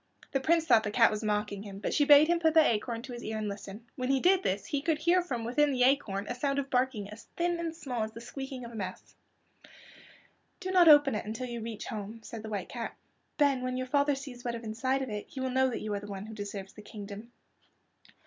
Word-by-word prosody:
The 270 - +1
Prince 325 +4 +2
thought 230 -9 +6
the 215 - -3
cat 230 +2 +5
was 215 +1 -3
mocking 210 -1 -1
him, 200 -2 -8
but 200 - -3
she 290 - +3
bade 295 +1 +8
him 345 0 +2
put 320 -1 +2
the 320 -1 +7
acorn 230 +1 -1
to 255 - -8
his 240 - -7
ear 220 0 -3
and 215 -1 -2
listen. 200 +2 -7
When 255 0 -3
he 270 0 +3
did 370 +5 +4
this 195 - -1
he 285 - -2
could 320 +1 +1
hear 345 +4 +3
from 255 -10 -4
within 285 +5 +2
the 250 -2 +2
acorn 225 -7 +2
a - - -2
sound 275 +3 -1
of 275 -1 -2
barking 250 -5 0
as 210 - -11
thin 345 0 0
and 330 -1 -3
small 255 -8 -4
as 220 0 -2
the 230 - -8
squeaking 265 +1 -7
of 235 - -9
a - - -10
mouse. 190 -4 -6 1.5
"Do 370 - -4
not 360 -2 +6
open 290 -3 +8
it 210 - -2
until 225 +4 -4
you 240 -2 -5
reach 225 -1 -6
home," 220 -1 -6
said 225 0 -7
the 220 - -7
White 205 -3 -4
Cat. 235 -2 -5 0.4
"Then, 280 -3 +3
when 255 0 -2
your 255 - -2
father 285 +2 +2
sees 265 -3 -9
what 240 -1 -2
is 235 - -7
inside 260 +5 -1
of 260 - -5
it 210 0 -5
he 270 - -8
will 260 0 -1
know 260 +1 +3
that 240 - -4
you 215 -1 -3
are 200 - -1
the 205 - -9
one 200 0 -6
who 220 - -9
deserves 200 -2 -6
the 210 - -11
kingdom." 210 +2 -9
245 Hz, 260 wpm, -30 LUFS, 215-280 Hz, 1.5 s, bade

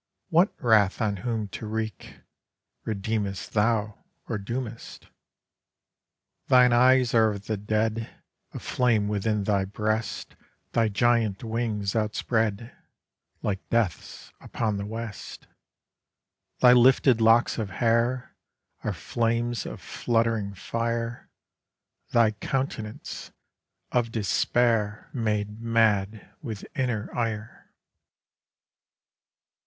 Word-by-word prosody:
What 175 +4 +4
wrath 110 -5 +4
on 105 -3 0
whom 110 +1 -2
to 110 - -7
wreak? 110 -2 -5 0.7
Redeemest 105 -2 -2
thou, 105 -1 +1 0.3
or 110 - -2
doomest? 115 +3 -6 1.4
Thine 125 -1 +6
eyes 125 0 +5
are 110 -2 +5
of 100 0 -8
the 110 - -1
dead; 110 +2 -1 0.4
A - - -7
flame 115 -5 +1
within 105 0 0
thy 100 -1 +1
breast 110 +3 -3 0.4
Thy 115 -1 +2
giant 110 -1 +1
wings 110 -3 -2
outspread, 110 0 -1 0.7
Like 100 -2 -1
Death's, 115 -7 -2
upon 110 -3 -2
the 100 0 -4
west 110 -1 -7 1.2
Thy 125 -1 +8
lifted 125 -1 +5
locks 115 +2 +4
of 105 -3 -2
hair 115 +5 0 0.5
Are - - -1
flames 120 0 -1
of - - -7
fluttering 115 -4 -1
fire; 115 +3 -3 0.8
Thy 115 -2 +4
countenance, 110 -1 -4 0.6
of 120 -2 +1
Despair 110 0 +1
Made 105 -2 -2
mad 110 -3 +1
with 110 -7 -6
inner 125 -7 -2
ire. 110 -2 -4
110 Hz, 100 wpm, -26 LUFS, 105-120 Hz, 1.4 s, Thy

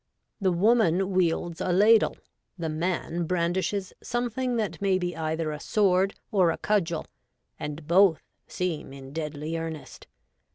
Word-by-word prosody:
The 190 -3 +2
woman 195 -1 +3
wields 170 -2 0
a 185 - 0
ladle; 210 +5 +5 0.4
the 165 -2 -3
man 170 +1 -2
brandishes 185 +3 -1
something 245 +1 -2
that 215 -4 -2
may 195 -2 +3
be 175 -1 -3
either 160 0 -2
a 150 - -5
sword 195 +1 +2 0.2
or 185 -5 +4
a 165 - -1
cudgel, 170 -6 0 0.5
and 150 +1 -6
both 180 -1 +4 0.2
seem 170 -6 -3
in 135 0 -10
deadly 155 0 -4
earnest. 165 -2 -7
175 Hz, 135 wpm, -27 LUFS, 160-195 Hz, 0.5 s, ladle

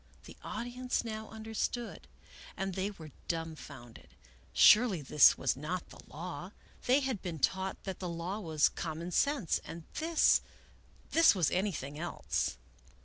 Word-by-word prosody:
The - - -12
audience 250 +1 -3
now 220 -1 -6
understood, 220 +2 -4 0.5
and 195 0 -2
they 190 +2 -1
were 160 -7 -11 0.2
dum 165 -1 -2
founded. 120 -6 -12 0.4
Surely 210 -8 +6
this 140 0 +6
was - - +1
not 165 +6 -4
the - - -13
law. 175 +3 -7 0.3
They 260 +3 +5
had 260 -7 -2
been 170 -3 -4
taught 190 +6 -1
that 190 -2 -5
the 180 - -4
law 170 +5 -4
was 160 -6 +2
common 165 +1 -5
sense, 280 - +1
and 165 0 -8 0.2
this, 325 0 +4 0.3
— - - -29
this 330 -8 +6
was 175 -6 +2
anything 160 -7 -2
else. 170 - -2
185 Hz, 145 wpm, -32 LUFS, 160-220 Hz, 0.5 s, Surely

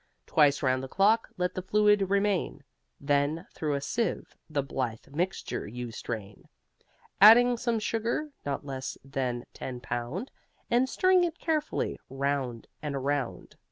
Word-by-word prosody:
Twice 145 -2 +3
round 130 -1 +2
the 135 - -5
clock 210 - +3
let 180 0 0
the 185 - -3
fluid 205 0 +3
remain, 200 -7 0 0.4
Then 145 +3 +1
through 150 -2 -1
a 140 - -2
sieve 230 +11 -2
the 145 -3 0
blithe 125 -4 -4
mixture 175 - -2
you 120 +2 -6
strain, 105 -3 -7 0.7
Adding 240 +4 +9
some 235 -1 0
sugar 230 +7 -1
(not 140 0 -3
less 135 -2 -5
than 125 -3 -2
ten 125 -2 -6
pound) 125 - -4 0.4
And 250 +2 +3
stirring 370 +3 +4
it 340 -1 -1
carefully, 310 -2 -1
round 135 -3 -2 0.2
and 145 -2 -3
around. 140 -1 -2
150 Hz, 140 wpm, -29 LUFS, 130-215 Hz, 0.7 s, Adding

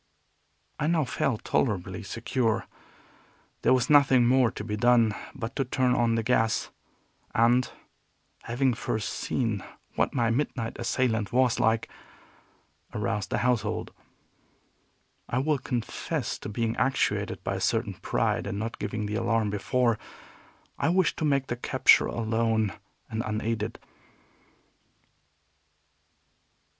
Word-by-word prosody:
I 150 - 0
now 165 -1 +2
felt 125 -2 -1
tolerably 95 -4 0
secure. 115 +2 -1 1.0
There - - +3
was 130 -2 +3
nothing 135 -4 +5
more 125 0 +4
to 105 - -7
be 105 -1 -3
done 115 -1 +4 0.2
but 125 -1 -5
to 135 - +2
turn 130 0 +1
on 120 -2 +2
the 115 - 0
gas, 115 -2 +1 0.6
and, 120 +2 +3 0.7
having 125 +2 +1
first 110 -2 -2
seen 110 -6 -2 0.3
what - - 0
my 115 -3 +2
midnight 120 -3 -2
assailant 115 -3 0
was 125 -1 +2
like, 110 0 +2 1.1
arouse 105 -2 -1
the - - -1
household. 125 -3 0 1.4
I 125 - -1
will 145 +2 +1
confess 125 -3 -3
to - - -6
being 115 +2 -1
actuated 130 +1 0
by - - -1
a - - -3
certain - - 0
pride - - -1
in - - -3
not 115 +2 -4
giving 105 -1 -3
the 105 - -4
alarm 115 -2 +1
before; 115 +3 +1 0.8
I - - +2
wished 185 0 +2
to 155 - -1
make 140 -2 +2
the 120 - -3
capture 130 +1 +4
alone 110 -3 0 0.4
and 110 0 -1
unaided. 110 0 -2
115 Hz, 125 wpm, -27 LUFS, 110-130 Hz, 1.4 s, nothing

